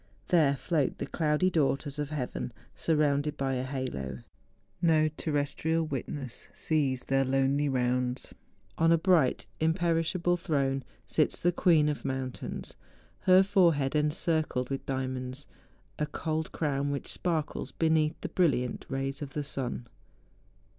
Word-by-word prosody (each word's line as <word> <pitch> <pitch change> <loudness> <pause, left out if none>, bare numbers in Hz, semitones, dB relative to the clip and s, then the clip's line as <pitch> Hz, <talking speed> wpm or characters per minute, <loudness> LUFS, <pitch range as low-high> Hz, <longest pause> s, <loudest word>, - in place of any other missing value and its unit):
There 155 -6 +4
float 140 +2 0
the - - -3
cloudy 160 +3 +1
daughters 145 -2 0
of 145 -1 -2
heaven 130 -4 -4 0.2
surrounded 150 -2 +1
by 135 -1 0
a 125 0 -1
halo. 70 - -4 0.6
No 155 -2 +4
terrestrial 155 +2 -1
wituess 135 -2 -4
sees 140 -5 0
their 135 0 +2
lonely 135 +2 +2
rounds. 125 0 0 0.5
On 165 0 +5
a 165 - +6
bright, 160 -6 +3
imperishable 170 +1 +1
throne, 140 -6 0 0.2
sits - - +1
the 175 - +2
queen 170 -4 +4
of 150 -1 -1
moun¬ 130 -1 -2
tains, - - -7 0.5
her 185 +1 +6
forehead 170 -9 +3
encircled 150 -3 +1
with 135 - -4
diamonds, 130 0 -3 0.5
a 150 - 0
cold 160 0 -3
crown 145 -2 -1
which 140 -1 -3
sparkles 160 -4 -2
beneath 160 -1 +1
the - - -4
brilliant 140 -9 +1
rays 135 +2 -2
of 140 -2 -6
the 150 - -2
sun. 130 -3 -3
145 Hz, 135 wpm, -29 LUFS, 135-160 Hz, 0.6 s, a